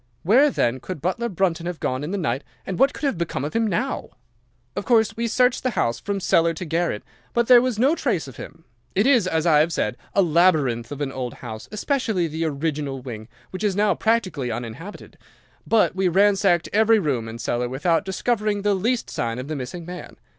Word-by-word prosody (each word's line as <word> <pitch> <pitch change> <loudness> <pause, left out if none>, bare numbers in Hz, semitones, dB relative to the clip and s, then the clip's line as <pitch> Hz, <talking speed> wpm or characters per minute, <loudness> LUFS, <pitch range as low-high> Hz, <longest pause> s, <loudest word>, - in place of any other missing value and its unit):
Where 255 - +5
then 125 - 0
could 180 +4 -6
butler 190 - -1
Brunton 175 -3 -1
have 175 -2 -4
gone 130 +2 -2
in 150 - -4
the 200 - -2
night, 140 -7 -1 0.2
and 190 - -4
what 270 +2 +5
could - - -11
have 270 -11 0
become 155 -5 -2
of 150 - -5
him 230 -1 +1
now? 235 +8 -2 0.7
"'Of - - -2
course 225 -4 +3
we 235 +1 -1
searched 250 +2 +2
the 255 - 0
house 115 0 +1
from 200 0 -3
cellar 165 -2 +2
to 180 - -5
garret, 165 -8 -1 0.3
but 235 0 +3
there 245 0 +7
was 250 -3 -1
no 265 +7 +4
trace 205 - -1
of 130 - -11
him. 165 - -10 0.3
It 200 - +3
is, 250 -8 +4
as 160 -2 0
I 155 -3 +5
have 160 +3 +2
said, 120 -7 -1 0.2
a 200 - +5
labyrinth 155 -9 +2
of 145 0 -6
an 140 -2 -2
old 125 -3 -5
house, 110 -2 -8
especially 215 - 0
the 160 +1 -3
original 145 -2 -2
wing, 115 -4 -8 0.2
which 185 +3 -6
is 205 -3 +1
now 210 +1 +3
practically 195 - 0
uninhabited; 120 - -7 0.5
but 225 -4 +3
we 190 0 +1
ransacked 190 -1 +3
every 220 +2 +5
room 135 - -1
and 115 +1 -7
cellar 120 +1 -1
without 160 +7 +1
discovering 205 +1 -1
the 205 -1 +3
least 230 +6 0
sign 115 0 -3
of 130 +3 -6
the 155 - -2
missing 145 +6 -6
man. 180 +1 -9
175 Hz, 210 wpm, -23 LUFS, 140-210 Hz, 0.7 s, there